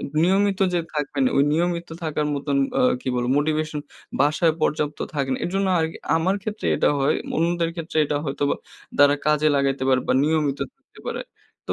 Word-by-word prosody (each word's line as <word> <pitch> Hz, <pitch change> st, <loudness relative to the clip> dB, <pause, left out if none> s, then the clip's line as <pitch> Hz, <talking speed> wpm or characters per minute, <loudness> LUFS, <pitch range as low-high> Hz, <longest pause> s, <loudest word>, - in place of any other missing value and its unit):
আ -, -, -7 dB, 0.2 s
নিয়মিত 195 Hz, +2 st, +2 dB
যে 175 Hz, -, +2 dB
থাকবে 145 Hz, -1 st, -3 dB
না 255 Hz, -, +3 dB
ওই 140 Hz, -, +5 dB
নিয়মিত 170 Hz, +1 st, 0 dB, 0.2 s
থাকার 150 Hz, -1 st, -1 dB
মতন 140 Hz, 0 st, -1 dB, 0.2 s
আ -, -, +3 dB, 0.2 s
কি -, -, -5 dB
বলবো 120 Hz, 0 st, 0 dB
মোটিভেশন 155 Hz, 0 st, -1 dB, 0.4 s
বাসায় 150 Hz, +3 st, +3 dB
পর্যাপ্ত 150 Hz, -1 st, 0 dB, 0.2 s
থাকে 140 Hz, -2 st, -1 dB
না। -, -, -1 dB
এরজন্য 195 Hz, +2 st, 0 dB
আরকি 160 Hz, 0 st, -2 dB, 0.2 s
আমার 175 Hz, +4 st, +1 dB
ক্ষেত্রে 215 Hz, +1 st, -4 dB
এটা -, -, +3 dB
হয় 135 Hz, -, +2 dB, 0.2 s
অন্যদের 170 Hz, 0 st, +1 dB
ক্ষেত্রে 165 Hz, -1 st, -6 dB
এটা 145 Hz, 0 st, -1 dB
হয়তো 140 Hz, 0 st, -2 dB, 0.5 s
তারা 145 Hz, 0 st, +6 dB
কাজে 150 Hz, 0 st, +3 dB
লাগাইতে 135 Hz, -1 st, 0 dB
পারে 130 Hz, -1 st, +4 dB
বা -, -, +4 dB
নিয়মিত 150 Hz, -3 st, +1 dB, 0.2 s
থাকতে -, -, -24 dB
পারে। -, -, -3 dB, 0.4 s
তো -, -, -1 dB
155 Hz, 185 wpm, -23 LUFS, 145-170 Hz, 0.5 s, তারা